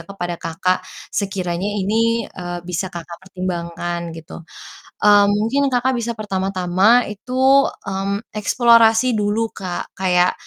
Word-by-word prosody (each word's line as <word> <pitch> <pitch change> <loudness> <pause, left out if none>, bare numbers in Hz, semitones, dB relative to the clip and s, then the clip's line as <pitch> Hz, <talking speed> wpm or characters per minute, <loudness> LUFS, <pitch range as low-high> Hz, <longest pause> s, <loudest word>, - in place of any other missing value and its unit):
kepada 175 -3 -5
Kakak 175 +3 -1 0.3
sekiranya 190 -1 -2
ini, 225 +3 +1
eee, 175 -1 -6
bisa 180 +1 -3
Kakak 170 -1 -9
pertimbangkan 175 -2 -5
gitu, 160 +1 -10 0.6
eee, 205 -1 +7
mungkin 230 +7 +1
Kakak 255 +1 +1
bisa 235 -1 -3
pertama-tama 195 +2 +2
itu, 260 +6 +3 0.2
mmm, 200 +2 -3
eksplorasi 230 +2 +4
dulu 215 +1 0
Kak 180 -2 -6
kayak 180 -1 +2
195 Hz, 115 wpm, -20 LUFS, 180-225 Hz, 0.6 s, eee